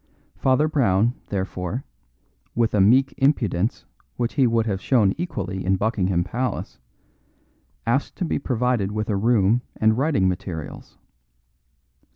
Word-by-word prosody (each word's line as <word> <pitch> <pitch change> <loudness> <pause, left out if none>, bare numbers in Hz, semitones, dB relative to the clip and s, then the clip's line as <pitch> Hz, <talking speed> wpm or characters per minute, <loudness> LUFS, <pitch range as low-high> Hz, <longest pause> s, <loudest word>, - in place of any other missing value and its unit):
Father 135 +3 +2
Brown, 115 -6 +2
therefore, 95 +4 -3 0.7
with 115 -1 +1
a 105 - +3
meek 130 +7 +4
impudence 115 - +1 0.3
which 120 -1 -1
he 135 -3 +3
would 115 -1 +1
have 100 -3 -2
shown 110 -7 +3
equally 95 - -4
in 95 +1 +2
Buckingham 95 -4 0
Palace, 120 - -4 1.1
asked 120 +5 0
to 180 - -2
be - - -1
provided 125 -6 0
with 110 +1 -2
a - - +1
room 110 +1 +3
and 110 0 +3
writing 135 -10 +2
materials. 90 -4 -5
110 Hz, 130 wpm, -23 LUFS, 95-125 Hz, 1.1 s, meek